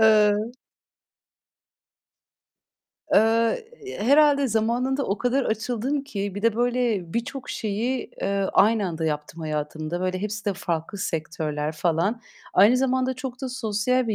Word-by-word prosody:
eee 215 -1 +6 2.8
Eee, 230 - +3 0.3
herhâlde 280 +4 +4
zamanında 245 +5 0
o 200 - -1
kadar 255 +2 +1
açıldım 245 +6 -1
ki 200 -6 -4
bir 205 - -5
de 230 -2 +3
böyle 240 -7 0
birçok 255 +3 -3
şeyi, 230 +4 -2
eee, 195 0 0
aynı 215 -1 +4
anda 165 -2 -3
yaptım 150 +1 -3
hayatımda. 155 +2 -3
Böyle, 185 0 -1
hepsi 210 0 -4
de 205 - +1
farklı 170 +1 -3
sektörler 155 -3 -2
falan. 170 +8 0 0.3
Aynı 210 +7 +6
zamanda 260 0 +1
çok 255 -1 -6
da 265 - -2
sosyal 250 0 0
bir 215 - +1
220 Hz, 125 wpm, -24 LUFS, 185-250 Hz, 2.8 s, eee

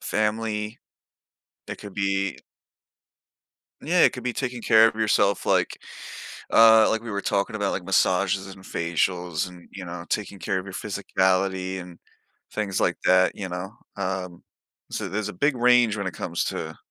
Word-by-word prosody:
family. 105 0 -1 0.9
It - - -6
could 100 -2 -9
be 100 -1 0 1.4
Yeah, 175 +4 +2
it - - +5
could 125 - -7
be 125 - -1
taking 125 -2 -3
care 110 0 +6
of 110 - -3
yourself 105 -2 +2
like, - - +1 0.8
uh, 110 -1 +7
like 110 0 0
we 115 - -6
were 100 0 -2
talking 100 +3 -1
about, 100 -2 0
like, 90 - -3
massages 95 +1 +2
and 95 0 -12
facials 85 +1 -1
and, 90 -1 -15
you 95 -2 -7
know, 85 0 -7
taking 100 -1 -3
care 95 - -1
of 95 - -6
your 95 - -8
physicality 95 -2 0
and 90 -1 -11 0.5
things 100 -3 -2
like - - +2
that, 95 0 +4
you 100 -2 -5
know, 90 +3 -5 0.2
um, 90 -2 -4 0.5
so - - -3
there's 105 +2 -2
a - - -9
big 140 +8 +1
range 120 -3 +4
when 100 -2 -3
it 90 - -8
comes - - -2
to - - -4
100 Hz, 165 wpm, -25 LUFS, 95-110 Hz, 1.4 s, uh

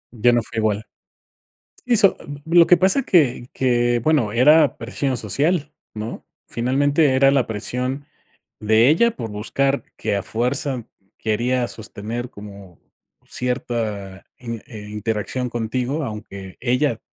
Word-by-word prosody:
Ya 120 +2 +4
no 120 -1 +2
fue 110 - -5
igual. 110 -1 0 1.0
Si 245 -1 +3
so 195 -2 +5 0.3
lo 170 +1 +5
que 180 - +7
pasa 190 +10 +3
que 135 - +2
que, 120 -2 +1
bueno, 130 -4 +1
era 150 +5 +5
presión 130 +3 -2
social, 145 - 0 0.2
¿no?, 110 +2 -6 0.2
finalmente 140 +4 +2
era 135 +1 +5
la 135 -4 +2
presión, 125 +6 -3 0.5
de 110 +2 +4
ella 235 +10 +4
por 115 -2 -5
buscar 135 +7 -1
que - - -1
a 100 - -2
fuerza 125 +3 0 0.3
quería 120 +3 0
sostener 115 +2 -6
como 100 -4 -12 0.5
cierta, 110 -6 -3
in 115 -2 -6
eh, 110 -6 -9
interacción 110 +4 -3
contigo, 125 +6 -2
aunque 100 -5 -8
ella 125 -1 +1
120 Hz, 130 wpm, -21 LUFS, 110-140 Hz, 1.0 s, que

